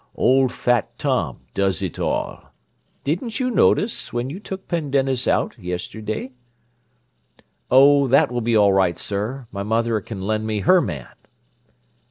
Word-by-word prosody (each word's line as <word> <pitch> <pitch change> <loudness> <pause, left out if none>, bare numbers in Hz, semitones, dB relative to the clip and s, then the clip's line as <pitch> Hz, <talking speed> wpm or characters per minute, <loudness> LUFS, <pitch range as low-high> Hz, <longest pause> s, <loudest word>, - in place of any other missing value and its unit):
Old 130 0 +3
fat 120 -4 0
Tom - - -1
does 100 -1 0
it 90 - -4
all. - - -3 0.5
Didn't 180 - -2
you 255 -1 0
notice, 215 0 +2
when 120 +3 -3
you 180 - -7
took 190 -2 -8
Pendennis 135 -6 0
out, - - +1
yesterday?" 105 +6 -5 1.4
"Oh, 140 +2 +6
that 130 0 +4
will 120 0 -2
be 115 0 +2
all 100 -2 +5
right, 95 -3 +2
sir. 110 +6 -4
My 100 - -5
mother 115 +1 0
can 95 -2 -7
lend 110 +2 -1
me 105 -2 -1
her 185 - +5
man." 75 - -6
120 Hz, 145 wpm, -22 LUFS, 100-140 Hz, 1.4 s, Oh